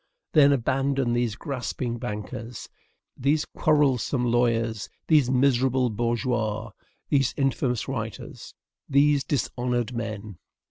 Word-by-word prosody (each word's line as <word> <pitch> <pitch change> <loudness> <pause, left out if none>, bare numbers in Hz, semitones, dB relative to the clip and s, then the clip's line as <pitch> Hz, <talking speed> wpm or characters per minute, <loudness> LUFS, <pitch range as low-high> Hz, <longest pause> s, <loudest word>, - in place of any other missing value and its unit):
Then 145 -2 +7
abandon 135 0 +1
these 120 -3 0
grasping 125 -3 -4
bankers, 115 +3 -6 0.5
these 145 +4 +1
quarrelsome 140 -4 +1
lawyers, 115 -3 +1 0.2
these 150 -6 +4
miserable 130 -1 +2
bourgeois, 115 -1 -1 0.4
these 135 -3 +2
infamous 130 -3 0
writers, 115 -5 -6 0.3
these 140 0 +4
dishonored 125 -3 -1
men. 110 -5 -5
125 Hz, 95 wpm, -26 LUFS, 115-135 Hz, 0.5 s, Then